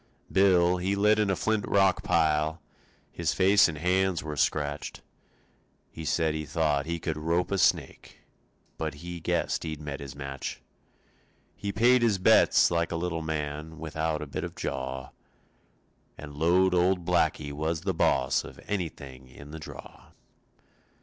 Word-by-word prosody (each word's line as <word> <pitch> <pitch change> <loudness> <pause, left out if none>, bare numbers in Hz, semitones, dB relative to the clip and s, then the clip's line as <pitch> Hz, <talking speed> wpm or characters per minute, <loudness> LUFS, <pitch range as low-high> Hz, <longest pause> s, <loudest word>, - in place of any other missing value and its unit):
Bill, 90 -2 +4
he 95 +2 -1
lit 105 +2 +3
in 105 -2 +2
a 95 - +2
flint 110 0 0
rock 95 -2 +3
pile, 80 -4 +1 0.5
His 85 -1 -2
face 100 +2 +5
and 80 -3 -5
hands 90 +2 +1
were 75 -1 -5
scratched. 75 0 -2 0.9
He 80 - -8
said 80 0 +1
he 80 0 -3
thought 75 -2 0
he 85 0 -2
could 80 -1 -3
rope 85 +4 0
a 100 - 0
snake - - 0 0.6
But 80 -2 -3
he 90 0 -6
guessed - - -1
he'd 80 -2 -5
met 75 -2 -6
his 70 -2 -8
match. 70 -1 -6 1.0
He 100 - -4
paid 120 +4 +4
his 115 -4 +2
bets 95 - +5
like 85 0 0
a - - -2
little 85 -1 -2
man 75 0 -4
Without 80 0 -3
a - - -5
bit 70 - -5
of - - -6
jaw, 65 -1 -4 1.1
And 75 -1 -9
lowed 90 +5 +3
old 90 0 +2
Blackie 80 -4 +1
was 80 +2 -2
the 95 +1 -1
boss 65 -5 +2
Of - - -11
anything 70 -9 -5
in 70 +3 -13
the 80 - -7
draw. - - -12
80 Hz, 155 wpm, -28 LUFS, 75-90 Hz, 1.1 s, face